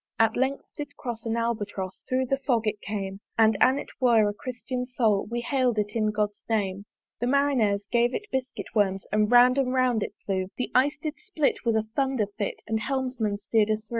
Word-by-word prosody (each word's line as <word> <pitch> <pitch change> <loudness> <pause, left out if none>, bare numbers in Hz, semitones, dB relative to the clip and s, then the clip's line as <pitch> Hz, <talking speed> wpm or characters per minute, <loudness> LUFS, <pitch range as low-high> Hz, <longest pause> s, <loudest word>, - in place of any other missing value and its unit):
At 225 0 +3
length 265 +2 0
did 290 -1 -7
cross 235 -2 -5
an 225 +1 0
Albatross, 205 -5 -3
Thorough 260 0 +1
the 270 +2 0
Fog 245 -4 0
it 210 -1 -1
came; 195 -2 -4 0.2
And 220 -1 +5
an 260 +2 +4
it - - -6
were 230 -4 +5
a 205 - -1
Christian 250 +1 -5
Soul, 225 -5 +1
We 240 +1 -2
hail'd 255 -3 +1
it 205 -1 0
in 215 -2 +2
God's 210 -1 -1
name. 200 -3 -1 0.3
The 240 - -1
Marineres 250 -7 +2
gave 240 +1 +2
it 420 - -4
biscuit 260 -1 -4
worms, 195 -3 +1
And 210 +1 +2
round 250 +2 +6
and 255 -2 +1
round 250 -3 +2
it - - -4
flew: 190 -2 -1
The 250 - -3
Ice 285 +4 +3
did 305 0 -5
split 320 -9 -1
with 230 -1 +2
a 220 0 0
Thunder 265 -5 +1
fit; 205 - -3
The 220 0 -1
Helmsman 250 -4 -1
steer'd 210 +1 +1
us 215 0 +1
thro'. - - -39
235 Hz, 210 wpm, -26 LUFS, 210-260 Hz, 0.3 s, round